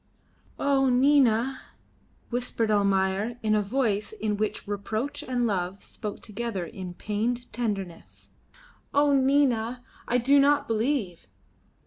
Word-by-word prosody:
"Oh! 270 -1 +2
Nina!" 260 -1 +3 0.7
whispered 235 -2 -1
Almayer, 200 +2 +1
in 215 -1 +2
a 210 - +3
voice 210 - -1
in 215 - -2
which 215 0 -3
reproach 215 +6 -3
and 245 -2 -1
love 190 -2 -2
spoke 210 -2 -7
together 210 -3 -4
in 185 -3 -8
pained 235 +5 -3
tenderness. 195 -8 -5 0.7
"Oh! 285 0 +4
Nina! 260 -3 +2 0.2
I 245 - +2
do 275 +4 +4
not 285 0 +3
believe." 225 - -1
230 Hz, 115 wpm, -27 LUFS, 205-265 Hz, 0.7 s, Oh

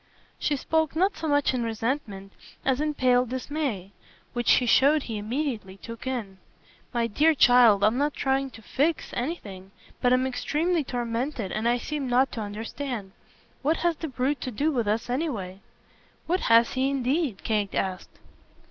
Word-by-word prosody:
She 295 - +1
spoke 320 +2 0
not 380 +5 +2
so 320 - -4
much 290 -2 +2
in 250 - -1
resentment 225 -3 -3 0.3
as 265 +1 +2
in 300 -1 -1
pale 250 -2 +3
dismay 255 - -3 0.4
which 240 -1 +3
he 250 - +3
showed 280 +5 +4
he 220 -3 -4
immediately 220 -4 -3
took 230 +4 -9
in. 215 -7 -4 0.5
"My 235 -2 0
dear 300 +8 +3
child, 240 -6 +6
I'm 225 +5 +3
not 290 +1 0
trying 270 0 0
to 225 - -16
'fix' 300 +8 -1
anything; 205 - -5 0.3
but 245 - +3
I'm 255 +1 +3
extremely 315 +6 0
tormented 240 -3 -3
and 220 +2 0
I 240 - +2
seem 280 +1 -4
not 255 +2 +3
to 225 - -5
understand. 215 +1 -5 0.5
What 310 +4 +1
has 340 -1 +3
the 320 - -4
brute 265 0 -1
to - - -3
do 285 +7 0
with 240 -6 -1
us 215 +2 0
anyway?" 240 - -3 0.7
"What 360 +2 +1
has 230 +1 +5
he 265 +1 +1
indeed?" 275 - -1
Kate 210 -3 -1
asked. 185 -1 -3
250 Hz, 165 wpm, -26 LUFS, 225-290 Hz, 0.7 s, child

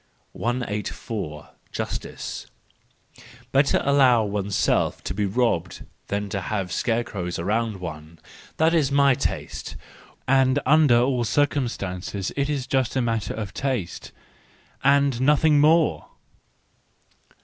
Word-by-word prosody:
184. 105 -8 -4 0.2
Justice - - -5 1.0
.—Better 140 +1 +3
allow 130 -5 +5
oneself 100 -1 0
to - - -3
be 100 +1 -1
robbed 95 -5 -1 0.2
than 100 0 -2
have 100 -2 -3
scarecrows 100 -4 -2
around 110 +4 -1
one—that 85 - -4
is 150 -5 +2
my 140 -1 +5
taste. - - -4 0.5
And 135 0 +3
under 145 -4 +5
all 125 0 +1
circumstances 105 -9 -1
it 140 0 0
is 140 -4 -2
just 130 -3 0
a 130 - +2
matter 115 -3 -2
of 105 -4 -5
taste—and 135 +3 -2
nothing 150 +2 +4
more 155 +2 +3
120 Hz, 100 wpm, -24 LUFS, 100-140 Hz, 1.0 s, allow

